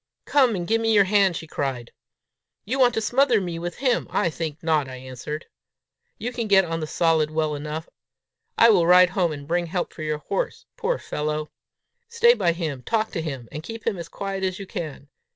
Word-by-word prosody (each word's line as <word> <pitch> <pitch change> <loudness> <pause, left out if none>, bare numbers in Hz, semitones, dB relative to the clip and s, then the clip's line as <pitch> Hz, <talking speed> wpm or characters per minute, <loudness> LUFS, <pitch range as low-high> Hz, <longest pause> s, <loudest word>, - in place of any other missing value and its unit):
"Come 260 -6 +3
and 175 -2 -3
give 225 +1 +2
me 225 0 +2
your 200 - +7
hand," 195 -2 +3
she 165 - -7
cried. 135 -6 -4 0.7
"You 255 +6 -2
want 245 -2 +4
to 225 - 0
smother 245 +1 +3
me 175 -3 -4
with 175 0 -4
him! 255 -3 +1
I 170 - +1
think 155 +1 -4
I - - -39
will - - -16
not," 155 -4 +2
I 130 - -7
answered. 130 +4 -7 0.7
"You 245 - -4
can 235 -2 -3
get 195 -2 +5
on 165 -1 -3
the 155 - -4
solid 160 -2 +2
well 155 -1 0
enough. 150 +2 -5 0.7
I 230 0 +7
will 175 -5 +4
ride 180 0 +7
home 180 -3 +1
and 140 -2 -7
bring 175 +1 0
help 175 +1 -3
for - - -10
your 155 -1 -1
horse, - - -3
poor - - -1
fellow! 150 0 -3 0.6
Stay 470 0 +5
by 170 - +1
him, 155 -6 -4
talk 220 - -1
to 165 - -3
him, 135 -7 -5
and 150 - -6
keep 225 +7 -8
him 205 -6 -1
as 165 -1 -7
quiet 195 -1 -4
as 185 -1 -1
you 195 - -7
can. 155 -6 -6
175 Hz, 220 wpm, -24 LUFS, 155-215 Hz, 0.7 s, your